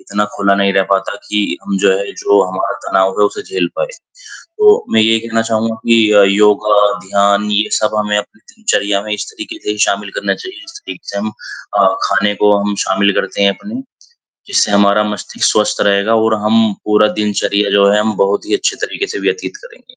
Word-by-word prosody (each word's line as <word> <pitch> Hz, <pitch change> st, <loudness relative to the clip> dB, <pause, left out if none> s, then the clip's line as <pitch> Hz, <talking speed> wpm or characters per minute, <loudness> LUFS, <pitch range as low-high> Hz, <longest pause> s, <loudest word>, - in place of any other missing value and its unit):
इतना 105 Hz, +1 st, -2 dB
खुला 100 Hz, -1 st, +2 dB
नहीं 100 Hz, 0 st, +1 dB
रह 95 Hz, -, +3 dB
पाता 95 Hz, 0 st, 0 dB
कि 105 Hz, -4 st, -1 dB
हम 100 Hz, -, -2 dB
जो 100 Hz, 0 st, +3 dB
है, 100 Hz, -, -5 dB
जो 100 Hz, -1 st, +2 dB
हमारा 95 Hz, +2 st, -3 dB
तनाव 95 Hz, +1 st, +1 dB
है 105 Hz, -, +5 dB
उसे -, -, -6 dB
झेल 400 Hz, -, -2 dB
पाएँ, -, -, -2 dB, 0.7 s
तो 425 Hz, +2 st, +4 dB
मैं 110 Hz, -, +5 dB
ये 115 Hz, +1 st, +3 dB
कहना 115 Hz, 0 st, -2 dB
चाहूँगा 115 Hz, 0 st, -1 dB
कि 115 Hz, -2 st, +4 dB
अ, 105 Hz, -1 st, +6 dB
योगा, 105 Hz, +1 st, +3 dB, 0.3 s
ध्यान 100 Hz, +1 st, +1 dB
ये 105 Hz, +1 st, +1 dB
सब 110 Hz, 0 st, -1 dB
हमें 105 Hz, 0 st, 0 dB
अपनी 105 Hz, -, -6 dB, 0.2 s
दिनचर्या 105 Hz, -, 0 dB
में 105 Hz, -, -4 dB
इस 105 Hz, +1 st, -5 dB
तरीके 325 Hz, 0 st, -9 dB
से -, -, -2 dB
शामिल -, -, -2 dB
करना -, -, -1 dB
चाहिए, 370 Hz, -1 st, -10 dB
जिस 330 Hz, 0 st, -12 dB
तरीके 335 Hz, -, -11 dB
से 100 Hz, -, -5 dB
हम 110 Hz, +1 st, -3 dB, 0.5 s
अ, 100 Hz, -1 st, +5 dB, 0.2 s
खाने 100 Hz, +1 st, +1 dB
को 105 Hz, 0 st, +5 dB
हम 100 Hz, 0 st, -2 dB
शामिल 100 Hz, +1 st, +1 dB
करते -, -, -5 dB
हैं 100 Hz, -, +5 dB
अपने, 220 Hz, +6 st, -7 dB, 0.7 s
जिससे 400 Hz, -, +1 dB
हमारा 100 Hz, +1 st, +3 dB
मस्तिष्क 105 Hz, -2 st, -3 dB
स्वस्थ 105 Hz, -1 st, 0 dB
रहेगा 100 Hz, +2 st, +2 dB
और 110 Hz, 0 st, +2 dB
हम 110 Hz, 0 st, +3 dB
पूरा 105 Hz, 0 st, +3 dB
दिनचर्या 105 Hz, -1 st, 0 dB
जो 100 Hz, 0 st, +4 dB
है 105 Hz, -, +3 dB
हम 110 Hz, +1 st, 0 dB
बहुत 100 Hz, +1 st, 0 dB
ही -, -, -1 dB
अच्छे 395 Hz, -1 st, -1 dB
तरीके 400 Hz, -, -4 dB
से -, -, -3 dB
व्यतीत 435 Hz, +1 st, -3 dB
करेंगे। -, -, -16 dB
105 Hz, 205 wpm, -14 LUFS, 100-115 Hz, 0.7 s, अ